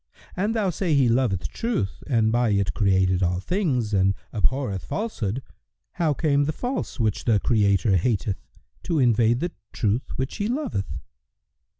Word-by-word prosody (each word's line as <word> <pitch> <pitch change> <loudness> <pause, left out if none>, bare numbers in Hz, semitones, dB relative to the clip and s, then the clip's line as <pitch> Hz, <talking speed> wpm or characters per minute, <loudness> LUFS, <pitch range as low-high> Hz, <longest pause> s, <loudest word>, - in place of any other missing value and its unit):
An 205 +4 0
thou 210 -5 +1
say 170 -2 0
He 135 -3 +4
loveth 115 -6 +1
Truth 225 - -2
and 115 -5 +2
by 120 0 +2
it 100 -3 +1
created 95 -3 +2
all 90 0 +1
things 125 - -1
and 95 0 +3 0.2
abhorreth 110 -3 -1
Falsehood, 130 - -3 0.5
how 170 -4 0
came 145 -1 +2
the 155 - 0
False, 245 - -4
which 110 -3 0
the 110 -4 +3
Creator 100 -3 +2
hateth, 100 -1 -1 0.4
to 165 - -1
invade 120 -1 +3
the 175 +1 -1 0.2
True 110 +3 +1
which 130 +1 -3
He 205 -1 -1
loveth?" 245 - -2
120 Hz, 155 wpm, -24 LUFS, 100-155 Hz, 0.5 s, He